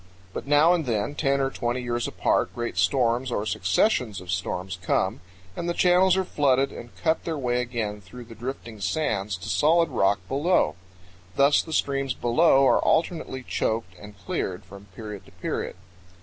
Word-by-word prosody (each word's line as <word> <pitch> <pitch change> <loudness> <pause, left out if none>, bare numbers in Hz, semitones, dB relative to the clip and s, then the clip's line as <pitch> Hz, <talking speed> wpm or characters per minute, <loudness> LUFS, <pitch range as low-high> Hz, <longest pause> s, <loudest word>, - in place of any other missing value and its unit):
But - - -6
now 150 +4 +5
and 165 -6 -1
then, 110 +4 -1
ten 140 -2 +1
or 135 0 0
twenty 120 0 -2
years 120 0 -1
apart, - - 0
great 120 -4 -3
storms 120 +7 +1
or 105 - -1
successions 105 - +1
of 90 0 -7
storms 90 0 -3
come, 95 -1 0 0.3
and 170 - -3
the 170 - -1
channels 185 +1 +4
are 190 - +2
flooded 140 -5 +1
and 120 - -9
cut 160 -1 0
their 165 -2 -3
way 125 -2 0
again 115 -4 -3
through 120 +6 -11
the 115 - -12
drifting 115 -2 -7
sands 100 -4 -1
to 95 - -9
solid 165 +2 +3
rock 100 -6 +2
below. 140 - +2 0.6
Thus 140 +1 +5
the 160 - -10
streams 135 -4 0
below 135 +2 +4
are - - +4
alternately 160 -5 0
choked 110 -6 -2
and 105 -1 -12
cleared 90 -1 -4
from 100 0 -12
period 105 -2 -9
to - - -16
period. 90 - -4
120 Hz, 175 wpm, -25 LUFS, 100-145 Hz, 0.6 s, now